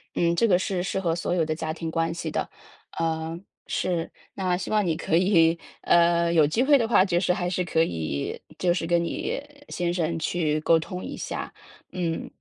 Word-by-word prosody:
嗯， 170 0 +2
这 230 - +3
个 180 -4 +5
是 185 0 -1
适 190 +1 -2
合 170 -3 0
所 175 +1 -1
有 165 -3 +2
的 155 - -1
家 160 0 -3
庭 160 0 -5
关 165 0 0
系 165 -1 -4
的。 - - -2 0.5
呃， 165 0 -2 0.3
是， 175 -3 -1 0.2
那 185 -2 0
希 - - -5
望 210 -2 +2
你 165 - +1
可 160 - 0
以， 170 -2 +4 0.2
呃， 170 0 +3
有 155 -3 +5
机 190 +12 +1
会 285 0 +5
的 230 - +1
话， 205 -5 +5
就 175 -3 +1
是 180 0 +1
还 180 -1 -1
是 180 0 0
可 165 -2 +2
以 80 - -3 0.2
就 175 -1 +2
是 170 -2 -2
跟 170 0 +3
你 170 - -2 0.3
先 175 -1 -1
生 165 -2 -1
去 155 -2 0
沟 165 +1 +4
通 180 +3 -6
一 - - -6
下， - - -5 0.4
嗯， 170 -3 -2
170 Hz, 220 characters per minute, -25 LUFS, 165-180 Hz, 0.5 s, 个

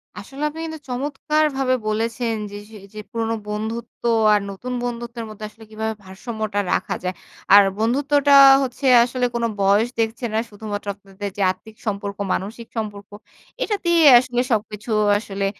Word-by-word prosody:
আসলে 275 +1 -9
আপনি 315 +2 -10
কিন্তু 320 -1 -6
চমৎকারভাবে 275 0 0
বলেছেন 230 +2 -1 0.2
যে - - -8 0.2
সেই 210 -3 -12
যে 215 - -8
পুরোনো 225 -1 -1
বন্ধুত্ব 220 +3 -5 0.3
আর 210 - +4
নতুন 240 +6 -6
বন্ধুত্বের 235 -1 -5
মধ্যে 215 0 -8
আসলে 220 +1 -17
কিভাবে 220 +1 -3
ভারসাম্যটা 215 +2 -4
রাখা 185 - -1
যায়। 180 0 -2 0.4
আর 205 0 +10
বন্ধুত্বটা 280 +5 +2 0.3
হচ্ছে 260 +2 -5 0.2
আসলে 250 +1 -1
কোন 235 - -1 0.2
বয়স 200 +4 +3
দেখছে 225 +2 -1
না। - - +1
শুধুমাত্র 205 -1 -6
আপনাদের 200 0 -7
যে - - -2
আর্থিক 220 +3 -13
সম্পর্ক, 200 -1 -3 0.2
মানসিক 225 +4 -5
সম্পর্ক 205 -2 -5 0.5
এটাতেই 345 -5 +1 0.2
আসলে 245 -1 -1
সবকিছু 210 0 -2 0.3
আসলে 200 -2 -4
225 Hz, 145 wpm, -21 LUFS, 205-250 Hz, 0.5 s, আর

